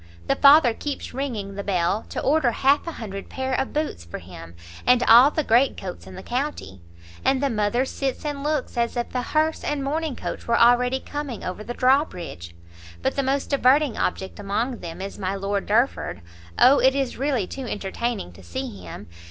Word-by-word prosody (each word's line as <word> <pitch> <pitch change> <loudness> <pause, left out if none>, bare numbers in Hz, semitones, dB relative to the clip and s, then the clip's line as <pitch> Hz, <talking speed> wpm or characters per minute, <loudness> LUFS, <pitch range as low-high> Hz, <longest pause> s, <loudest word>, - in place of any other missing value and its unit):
The - - +1
father 280 -4 +7
keeps 285 +4 -5
ringing 235 -7 -4
the 200 0 -5
bell 190 +2 0
to - - -4
order 285 -3 +3
half 275 +7 +2
a 335 - -3
hundred 195 -6 -7
pair 265 0 -3
of 265 - -1
boots 300 - -3
for 85 - -7
him, 85 -1 -11 0.3
and 250 -1 +4
all 240 +4 +8
the 310 +1 -1
greatcoats 225 - +1
in 95 - -10
the - - -9
county; 250 - -4 0.4
and 270 - +2
the 275 -1 0
mother 220 +4 +1
sits 270 +2 -3
and 290 -2 -3
looks 295 -4 -2
as 235 +1 0
if 240 - -3
a 250 - 0
hearse 310 +4 0
and 290 -2 -2
mourning 305 0 -2
coach - - -6
were 235 0 +3
already 245 +2 +4
coming 290 -5 -6
over 185 +4 -5
the 240 +2 -6
drawbridge; 180 - 0 0.5
but - - 0
the 275 - +1
most 275 +2 -1
diverting 280 0 +3
object 190 +1 -3
among 220 +5 -2
them 170 +1 -7
is 195 +1 -6
my 190 0 -2
Lord 195 0 -2
Derford! 235 +6 0 0.4
O, 270 +3 +6
it 265 +1 +4
is 270 -3 -1
really 265 -7 0
too 265 +6 -7
entertaining 210 - -3
to 85 - -15
see 90 +2 -6
him! 90 +4 -9
245 Hz, 195 wpm, -24 LUFS, 195-275 Hz, 0.5 s, all